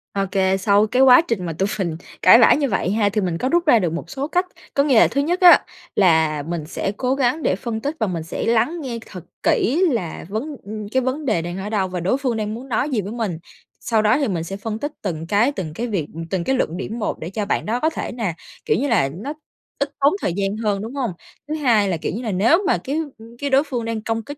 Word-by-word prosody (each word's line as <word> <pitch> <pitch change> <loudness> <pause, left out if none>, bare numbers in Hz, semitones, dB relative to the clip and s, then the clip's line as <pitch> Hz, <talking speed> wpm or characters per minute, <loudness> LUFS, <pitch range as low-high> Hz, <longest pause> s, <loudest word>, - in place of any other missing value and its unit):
Ô 200 - +1
kê, 190 -1 +2
sau 200 +2 +3
cái 250 +4 +2
quá 260 +2 +8
trình 200 -6 -1
mà 165 - -3
tụi 190 +5 -1
mình 170 -4 -2 0.2
cãi 205 +6 +8
vã 235 - +7
như 280 -2 +1
vậy 195 -3 0
ha, 205 -1 +2
thì 210 +1 -1
mình 175 -3 -1
có 255 - -1
rút 345 +2 +2
ra 245 -7 +6
được 175 -5 -1
một 170 - -5
số 275 +1 -3
cách. 360 +3 +1 0.3
Có 280 - +3
nghĩa 265 -6 +4
là - - +6
thứ 280 - 0
nhất 345 +6 -1
á 355 -1 +8 0.3
là 160 -5 +3
mình 170 -3 -3
sẽ 185 +4 -3
cố 255 +1 0
gắng 275 +3 0
để - - +2
phân 220 +3 -4
tích 290 +5 -3
và 220 - +1
mình 170 -4 -3
sẽ 165 - -4
lắng 235 +9 +1
nghe 240 -5 -4
thật 180 -4 -10 0.2
kỹ 290 - +2
là 185 -10 -3
vấn 270 +9 -4
ừm, 210 0 -7
cái 260 - +2
vấn 260 +4 -2
đề 215 -10 +1
đang 175 +2 -5
ở 195 +2 -5
đâu, 200 -3 0
và 180 -1 -4
đối 190 +9 +1
phương 255 -5 -1
đang 215 0 -2
muốn 250 +4 -8
nói 250 +5 0
gì 245 -7 0
với 200 +2 -6
mình. 220 -8 -3 0.4
Sau 225 -2 +1
đó 215 +3 +3
thì 285 - 0
mình 175 -6 -2
sẽ 195 +4 -6
phân 215 +1 -4
tích 290 +4 -3
từng 165 -5 -4
cái, 210 +8 +3
từng 180 - -5
cái 235 +8 -3
việc 185 -9 -2 0.2
từng 185 -1 -1
cái 265 - +1
luận 175 -9 -1
điểm 225 +6 -5
một 210 - -2
để 160 - -5
cho 205 +2 -3
bạn - - -1
đó 230 +3 -1
có 315 - +2
thể 325 - -5
nà, 225 -8 -2 0.3
kiểu - - +2
như 285 - 0
là, 185 - +2
nó 220 - -5 0.5
ít 280 - +1
tốn 280 +2 +4
thời 175 - -1
gian 200 +2 -1
hơn, 210 -3 -1
đúng 225 +5 -7
hông? 255 -7 -1 0.4
Thứ 305 - -3
hai 235 -9 +2
là, 175 - 0
kiểu - - -3
như 230 - -4
là, 225 -4 -3
nếu 230 - +3
mà - - +3
cái, 275 - -4 0.2
ừm, 225 +1 -14
cái 285 - -2
đối 270 +1 +4
phương 250 -6 -4
đang 225 -1 -3
công 225 0 -2
kích 285 +5 -8
220 Hz, 280 wpm, -21 LUFS, 190-265 Hz, 0.5 s, quá